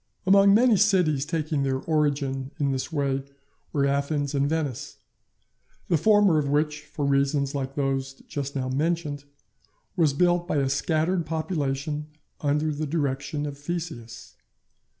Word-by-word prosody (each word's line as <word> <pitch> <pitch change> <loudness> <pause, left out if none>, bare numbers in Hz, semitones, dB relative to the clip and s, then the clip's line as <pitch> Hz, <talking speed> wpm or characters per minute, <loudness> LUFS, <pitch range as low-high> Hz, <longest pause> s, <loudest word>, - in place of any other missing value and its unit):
Among 195 +1 +6
many 235 -1 +5
cities 175 -8 +2
taking 155 -3 -1
their 135 -1 0
origin 140 -3 -1
in 140 -2 +1
this 130 +4 -3
way 140 -3 0 0.5
were 140 -2 +1
Athens 140 +1 0
and 140 0 +1
Venice; 150 -6 -3 0.9
the - - +4
former 205 -1 +4
of 140 -2 -1
which, 150 +1 0
for 145 0 -4
reasons 140 0 +1
like 135 -1 -3
those 135 -1 -1
just 140 -1 -4
now 130 -1 -1
mentioned, 145 +1 -1 0.7
was 160 -6 +3
built 175 +3 +2
by 155 - 0
a 135 -1 +1
scattered 160 +4 0
population 150 -2 -2 0.3
under 150 +1 0
the 150 +1 -3
direction 140 -1 -2
of 140 -1 -6
Theseus. 145 -8 -6
145 Hz, 140 wpm, -26 LUFS, 140-160 Hz, 0.9 s, Among